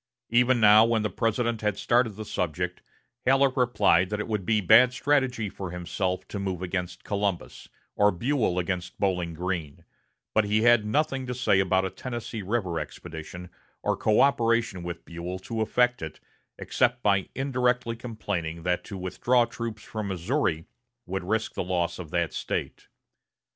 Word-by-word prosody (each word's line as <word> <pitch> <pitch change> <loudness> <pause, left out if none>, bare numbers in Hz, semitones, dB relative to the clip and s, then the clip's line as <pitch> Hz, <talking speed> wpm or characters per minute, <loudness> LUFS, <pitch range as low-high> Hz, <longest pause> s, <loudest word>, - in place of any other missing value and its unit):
Even 125 +1 +4
now, 105 0 +8
when 115 -1 +2
the 105 - -1
President 115 +2 0
had 105 -2 0
started 120 -2 +2
the 110 - -7
subject, 85 -7 -3 0.4
Halleck 135 0 +3
replied 110 -8 +3
that 105 0 -2
it 105 - -3
would 105 -5 -3
be 110 -2 +3
bad 115 +6 +6
strategy 130 -5 +1
for 95 -1 -6
himself 90 +1 -3
to 100 - -4
move 95 -2 -3
against 90 -1 -4
Columbus, 100 -3 -3 0.3
or 105 0 +5
Buell 110 0 0
against 90 0 -3
Bowling 90 -4 0
Green; 85 -4 -4 0.5
but 110 - +4
he 105 +1 +1
had 120 -3 +5
nothing 135 +1 0
to 125 - -3
say 120 -6 +3
about 95 0 +2
a 95 - -3
Tennessee 120 -3 -5
River 95 -5 -1
expedition, 85 +2 -8 0.3
or - - +1
coöperation 115 -4 +2
with 85 0 -6
Buell 85 +2 -5
to 110 +4 -4
effect 125 +3 +2
it, 80 -1 -7 0.4
except 125 -1 0
by 100 -2 +2
indirectly 125 -3 0
complaining 100 -9 -4
that 90 0 0
to 100 - -7
withdraw 120 +7 +2
troops 115 -2 -6
from 110 -2 -5
Missouri 90 - -1 0.4
would 95 -2 -3
risk 110 +4 -1
the - - -2
loss 85 -1 -1
of 85 -4 -7
that 85 0 -1
State. - - -4
105 Hz, 160 wpm, -27 LUFS, 90-120 Hz, 0.5 s, now